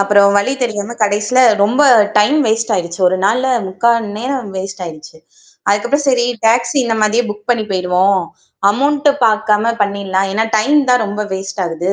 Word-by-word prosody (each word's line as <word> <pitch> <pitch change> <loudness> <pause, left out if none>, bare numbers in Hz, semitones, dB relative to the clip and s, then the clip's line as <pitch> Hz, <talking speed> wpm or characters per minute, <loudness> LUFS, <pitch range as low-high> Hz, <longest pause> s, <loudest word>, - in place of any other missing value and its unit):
அப்புறம் 200 0 +4
வழி 230 +7 -1
தெரியாம, 220 0 -4
கடைசில, 210 +5 +1 0.2
ரொம்ப 250 +8 +1 0.4
டைம் 275 +9 +3
வேஸ்ட் 225 +1 -1
ஆயிடுச்சு. 170 +1 -5
ஒரு 185 +1 -2
நாள்ல 250 +5 0 0.2
3/4 235 +5 +1 0.2
நேரம் 250 -2 -4
வேஸ்ட் 190 0 -6
ஆயிடுச்சு. 155 -1 -11 0.5
அதுக்கப்புறம் 240 +8 0
சரி, 245 -2 +2 0.2
டாக்ஸி 240 +4 +1
இந்த 225 -1 -1
மாதிரியே 225 +3 +1
புக் 210 +3 -10
பண்ணி 235 -3 0
போயிடுவோம். 185 +1 +1 0.5
அமௌண்ட்டு 285 +4 +1
பார்க்காம 215 +1 +1
பண்ணிடலாம். 195 -1 -2
ஏன்னா 220 +1 0
டைம் 285 +8 +2
தான் 250 -3 +3
ரொம்ப 205 +1 -5
வேஸ்ட் 190 0 -5
ஆகுது. 170 +4 -3
210 Hz, 155 wpm, -15 LUFS, 195-240 Hz, 0.5 s, அப்புறம்